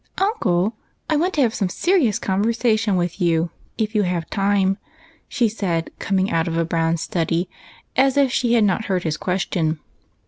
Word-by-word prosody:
" - - -42
Uncle, 225 - +1 0.4
I - - +4
want 350 +5 +1
to 295 - +2
have 235 -4 +2
some 195 -5 -1
serious 310 - +2
conversation 220 0 +1
with 175 +1 -2
you, 170 -1 +1 0.3
if 215 0 -1
you 210 - +3
have 175 -4 -1
time," 195 0 +1 0.5
she 240 - +2
said, 180 -6 -2
coming 190 0 0
out 165 0 +1
of 165 0 -2
a 165 - +1
brown 165 0 0
study, 170 +1 -1 0.5
as 270 +1 +3
if 275 -3 +4
she 240 -2 +1
had 230 -2 +4
not 210 +2 +1
heard 185 -2 -1
his 160 -2 -1
question. 170 -3 -1
195 Hz, 180 wpm, -21 LUFS, 170-230 Hz, 0.5 s, I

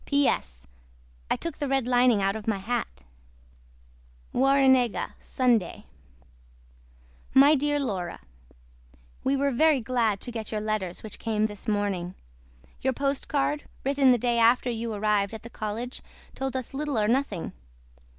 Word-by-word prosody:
P.S. 160 - 0 0.6
I - - +2
TOOK 335 - -6
THE 290 - -1
RED 270 -2 +1
LINEING 245 -4 +3
OUT 195 +1 +1
OF 220 -1 -7
MY 220 -3 +1
HAT. 190 - -4 1.3
WARRENEGA 265 -3 +3
SUNDAY. 240 -9 0 1.5
MY 280 +3 +8
DEAR 290 0 +1
LAURA 190 -10 -3 1.1
WE 275 +1 +1
WERE 280 +1 +1
VERY 305 +2 +4
GLAD 230 -4 0
TO 245 - -6
GET 225 -2 -5
YOUR 215 - -1
LETTERS 210 -5 -3
WHICH 220 - -7
CAME 215 -2 0
THIS 210 -2 -6
MORNING. 200 -4 -1 0.7
YOUR 265 0 +1
POSTCARD 280 +2 -1 0.2
WRITTEN 275 -1 +4
THE 245 - +4
DAY 240 0 +1
AFTER 240 +2 +4
YOU 230 0 -3
ARRIVED 210 0 0
AT 220 - -9
THE 235 - -10
COLLEGE 225 +4 -5 0.3
TOLD 265 -1 -4
US 260 -1 -4
LITTLE 290 -2 -2
OR 210 -1 +2
NOTHING. 235 -7 -1
240 Hz, 140 wpm, -27 LUFS, 210-270 Hz, 1.5 s, MY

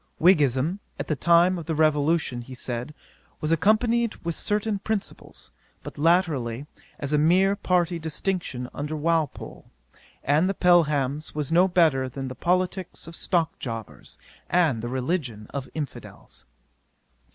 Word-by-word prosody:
Whiggism, 155 0 +3 0.2
at - - -5
the 155 - +1
time 170 +4 +4
of 165 - -9
the 160 - -1
Revolution, 155 -3 +1
he 130 +2 -10
said, 125 +4 -5 0.4
was 155 - -1
accompanied 220 +7 +2
with 170 - 0
certain 210 +3 -1
principles; 200 - -5 0.3
but - - -9
latterly, 145 -7 +1 0.3
as 145 +1 -3
a 150 - +4
mere 185 +6 +4
party 180 -3 0
distinction 160 -5 -3
under 150 +2 -4
Walpole 160 -1 -2 0.5
and 155 +6 +2
the 195 - -1
Pelhams 150 -6 +2
was 150 -2 -3
no 175 +3 +5
better 155 -8 +2
than 135 +1 -5
the - - -6
politicks 185 +1 -1
of 165 - -7
stock 165 -2 0
jobbers, 115 -5 -7 0.3
and 160 -10 +2
the 120 - -4
religion 130 - -2
of 140 -2 -5
infidels. 150 -5 -7
160 Hz, 140 wpm, -25 LUFS, 135-180 Hz, 0.5 s, no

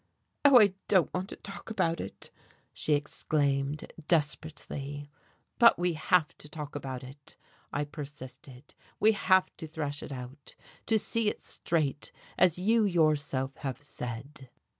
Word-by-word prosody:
"Oh, 280 -3 +9
I 205 -4 +5
don't 185 -5 +3
want 185 +2 -2
to - - -6
talk 195 - -9
about 170 -6 0
it," - - -9 0.4
she 155 - 0
exclaimed, 145 -1 -1
desperately. 145 -2 -1 0.5
"But 235 -1 +8
we 175 0 +1
have 155 +1 +2
to 150 - -9
talk 150 -2 -6
about 130 -3 -5
it," 135 +2 -12 0.4
I 145 - 0
persisted. 140 -2 -10 0.3
"We 220 - +6
have 190 -3 +3
to 160 - -7
thrash 150 -2 -3
it - - -7
out, 130 +2 -8 0.3
to 225 - +4
see 220 0 +1
it - - -7
straight, 150 -4 -1 0.2
as 180 -2 +4
you 220 +5 +3
yourself 150 -7 +1
have 135 -1 -5
said." 130 +1 -7
150 Hz, 140 wpm, -30 LUFS, 140-180 Hz, 0.5 s, Oh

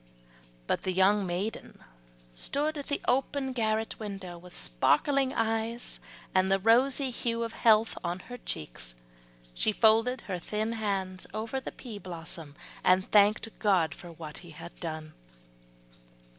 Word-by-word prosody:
But - - 0
the 185 - -1
young 195 +1 +4
maiden 185 +5 -3 0.6
stood 290 - 0
at 285 -2 -6
the 285 - -1
open 265 +1 +1
garret 220 -2 0
window, 195 -4 -6
with 175 +1 -12
sparkling 260 - +2
eyes 225 0 -1 0.3
and 190 0 +3
the 195 - +5
rosy 255 +6 +3
hue 235 -1 -1
of 230 - -4
health 220 0 +4
on 175 0 -1
her 245 +4 -9
cheeks, - - -6 0.6
she 215 - +2
folded 225 +4 +4
her 185 -3 -4
thin 215 +5 -2
hands 195 -4 -2
over 225 +5 -2
the - - -6
pea 225 -5 -8
blossom, 165 -5 -7 0.3
and 185 +1 +3
thanked 210 +1 +5
God 180 -6 +3
for 175 - -11
what 155 -2 -8
He 175 - -13
had 165 +2 -10
done. 155 -2 -5
210 Hz, 145 wpm, -30 LUFS, 175-230 Hz, 0.6 s, the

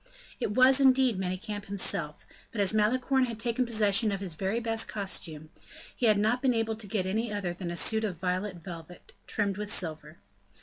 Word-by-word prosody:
It 205 - -2
was, 260 +1 +6
indeed, 260 -5 +4
Manicamp 190 +3 -4
himself; 190 -6 -2 0.3
but 220 - -6
as 200 0 +3
Malicorne 255 +5 +2
had 230 -2 -6
taken 240 +2 0
possession 215 -1 +3
of 195 - -2
his 190 -4 -3
very 195 +7 -1
best 225 -1 0
costume, 160 -6 -4 0.4
he 240 - +1
had 215 -1 +5
not 220 +4 +1
been 260 -3 +2
able 225 -1 0
to 215 -2 -6
get 195 -2 -1
any 215 +4 -1
other 200 -4 -2
than 175 0 -6
a 170 - -4
suit 220 +5 +1
of 195 -6 -2
violet 185 +2 -2
velvet, 170 0 -11
trimmed 200 -2 -1
with 210 0 -4
silver. 155 -2 -3
205 Hz, 190 wpm, -29 LUFS, 185-225 Hz, 0.4 s, was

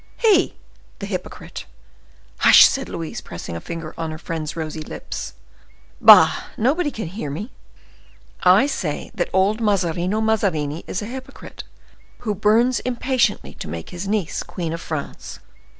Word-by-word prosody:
"He!—the 415 -6 0
hypocrite!" - - -6 0.7
"Hush!" - - +9
said 270 -1 -3
Louise, 165 -2 -5
pressing 85 - -7
a 85 - -5
finger 165 -2 -6
on 165 -1 -2
her 155 - -6
friend's 160 -1 -5
rosy 160 -1 -4
lips. - - -7 0.7
"Bah! - - +8
nobody 290 +8 +1
can 220 -7 -5
hear 170 -2 -5
me. 200 - -5 0.9
I 185 +7 +6
say 180 - -3
that - - -2
old 200 +4 +2
Mazarino 185 -1 +1
Mazarini 180 -9 0
is 185 - -3
a - - -4
hypocrite, 260 +3 -9 0.6
who 220 -4 -1
burns 220 +5 +3
impatiently 255 0 0
to - - -6
make 80 +1 -7
his 180 +2 -6
niece 200 -5 -1
Queen 165 -3 -5
of 165 - -5
France." 155 -3 -6
190 Hz, 140 wpm, -21 LUFS, 160-225 Hz, 0.9 s, Hush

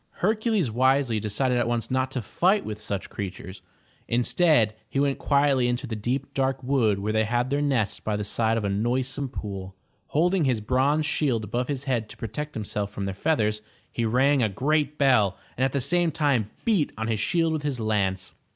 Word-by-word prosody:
Hercules 215 - +1
wisely 130 -1 +2
decided 120 +4 0
at 120 - +1
once 120 -1 -1
not 130 0 +1
to 130 -3 -4
fight 190 - +1
with 105 0 -6
such 100 -2 -3
creatures. 95 -1 -6 0.5
Instead, 120 -1 +3 0.2
he 135 - -1
went 140 -1 +1
quietly 140 -3 +3
into 120 +2 -1
the 115 -3 -4
deep 125 +6 -3
dark 135 0 0
wood 125 -6 +2
where 105 +2 -2
they 110 0 +3
had 120 +4 0
their 145 +1 +1
nests 130 -8 0
by 105 - -2
the 105 - -2
side 110 +2 0
of 115 - -2
a - - 0
noisome 130 +6 -1
pool. 95 -5 -6 0.3
Holding 175 +2 +2
his 125 -4 +1
bronze 135 +7 +1
shield 135 -6 0
above 120 +4 -2
his 140 -2 -3
head 120 -6 -1
to - - -12
protect 145 +7 -5
himself 105 -1 -3
from 100 -1 -6
their 95 0 -2
feathers, 105 -3 0 0.3
he 120 - -2
rang 130 +5 +3
a 110 - +2
great 150 +7 0
bell 115 -9 +3 0.2
and 130 - -1
at 135 - +2
the 140 - 0
same 175 +6 +1
time 140 -9 +1 0.2
beat 200 -10 +2
on 110 0 -2
his 110 -2 -1
shield 165 +1 +1
with 155 - -2
his 145 -4 -2
lance. 95 -4 -1
125 Hz, 200 wpm, -25 LUFS, 110-140 Hz, 0.5 s, Instead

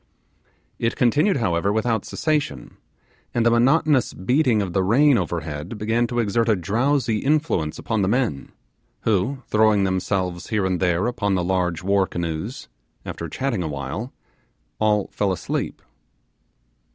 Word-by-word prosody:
It 115 +1 0
continued, 145 - +3
however, 100 -4 +1
without 110 0 0
cessation; 145 - -2 0.6
and 120 -1 +2
the 115 - +5
monotonous 135 +2 +3
beating 125 +3 +2
of 95 -4 -2
the 95 - +2
rain 130 +9 +4
over 85 -4 -1
head 75 +7 -6
began 115 +3 0
to 120 - -4
exert 115 +1 +1
a 110 - +4
drowsy 115 - 0
influence 140 - 0
upon 110 -3 -1
the 95 - +1
men, 110 - -1 0.5
who, 115 +6 0
throwing 110 -2 +3
themselves 95 -1 -1
here 105 -4 0
and 95 -2 0
there 90 -1 +1
upon 100 -5 0
the 90 - 0
large 90 -2 -1
war 100 0 +2
canoes, 85 +7 -4 0.4
after 85 - -5
chatting 130 - -2
awhile, 75 - -4 0.7
all 105 -2 +2
fell 100 -2 0
asleep. 90 -3 -3
105 Hz, 140 wpm, -23 LUFS, 90-120 Hz, 0.7 s, the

